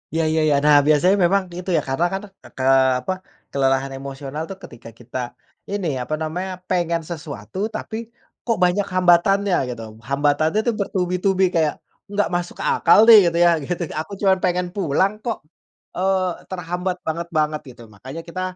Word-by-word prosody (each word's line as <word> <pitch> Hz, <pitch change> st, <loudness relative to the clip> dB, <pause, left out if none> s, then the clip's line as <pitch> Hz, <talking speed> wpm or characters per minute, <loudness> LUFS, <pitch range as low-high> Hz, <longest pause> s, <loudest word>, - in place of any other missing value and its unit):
Ya 165 Hz, -, +2 dB
ya 160 Hz, 0 st, +2 dB
ya. 145 Hz, -, +3 dB
Nah, 150 Hz, -1 st, +7 dB
biasanya 165 Hz, +6 st, +4 dB
memang 195 Hz, +2 st, +2 dB
gitu 180 Hz, +2 st, -7 dB
ya 155 Hz, -, +3 dB
karena 135 Hz, +6 st, 0 dB
kan 195 Hz, -, -2 dB, 0.4 s
ke 130 Hz, -, -3 dB, 0.4 s
apa 185 Hz, +9 st, -2 dB, 0.4 s
kelelahan 135 Hz, 0 st, +1 dB
emosional 140 Hz, +3 st, -6 dB
tuh 195 Hz, -, -7 dB
ketika 115 Hz, -, -11 dB
kita 120 Hz, +1 st, -8 dB, 0.5 s
ini 180 Hz, -10 st, -2 dB
apa 125 Hz, +5 st, -4 dB
namanya 180 Hz, +4 st, -3 dB, 0.2 s
pengen 170 Hz, -2 st, 0 dB
sesuatu 155 Hz, -, -5 dB
tapi 220 Hz, 0 st, -6 dB, 0.5 s
kok 230 Hz, -, +2 dB
banyak 180 Hz, +3 st, +2 dB
hambatannya 185 Hz, +2 st, +4 dB
gitu, 120 Hz, -2 st, -6 dB, 0.3 s
hambatannya 145 Hz, +6 st, +2 dB
tuh -, -, +4 dB
bertubi-tubi 190 Hz, 0 st, 0 dB
kayak 160 Hz, -2 st, +2 dB, 0.3 s
enggak 205 Hz, +1 st, 0 dB
masuk 175 Hz, 0 st, -3 dB
akal 215 Hz, -, +5 dB
deh 225 Hz, -, +11 dB
gitu 170 Hz, -, 0 dB
ya, -, -, +6 dB, 0.2 s
gitu 175 Hz, +2 st, -3 dB, 0.2 s
aku 160 Hz, +6 st, -6 dB
cuman 190 Hz, -2 st, +4 dB
pengen 180 Hz, 0 st, 0 dB
pulang 190 Hz, +3 st, +1 dB
kok, 230 Hz, -, -2 dB, 0.6 s
eee, 185 Hz, -1 st, 0 dB
terhambat 180 Hz, 0 st, -3 dB
banget-banget 155 Hz, -2 st, -1 dB
gitu. -, -, -15 dB
Makanya 130 Hz, +10 st, -9 dB
kita 175 Hz, +2 st, -6 dB
170 Hz, 160 wpm, -21 LUFS, 150-190 Hz, 0.6 s, deh